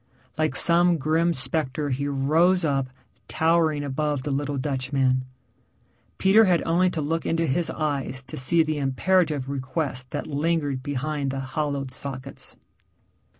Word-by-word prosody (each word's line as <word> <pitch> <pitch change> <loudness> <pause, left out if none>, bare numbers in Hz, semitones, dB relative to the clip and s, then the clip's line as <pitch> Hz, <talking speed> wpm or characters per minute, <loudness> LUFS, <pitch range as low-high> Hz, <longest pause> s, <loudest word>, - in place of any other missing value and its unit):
Like 155 -3 0
some 170 +4 +4
grim 160 +4 +1
spectre 145 0 -1
he 140 +3 -1
rose 160 +6 +2
up, 135 -3 0 0.4
towering 160 -2 +2
above 145 0 -1
the 145 - -3
little 145 +1 -1
Dutchman. 130 -1 0 0.9
Peter 205 +4 +5
had 180 -3 +2
only 175 +3 +2
to 165 -3 -3
look 165 +3 -1
into 165 0 0
his 165 +4 0
eyes 140 -4 -3
to - - -8
see 165 +6 +3
the 155 -1 -2
imperative 145 +1 +1
request 130 -1 -3
that 145 - -4
lingered 145 -2 -1
behind 145 +1 -2
the 135 0 -3
hollowed 140 0 -3
sockets. 135 0 -6
145 Hz, 140 wpm, -25 LUFS, 135-165 Hz, 0.9 s, Peter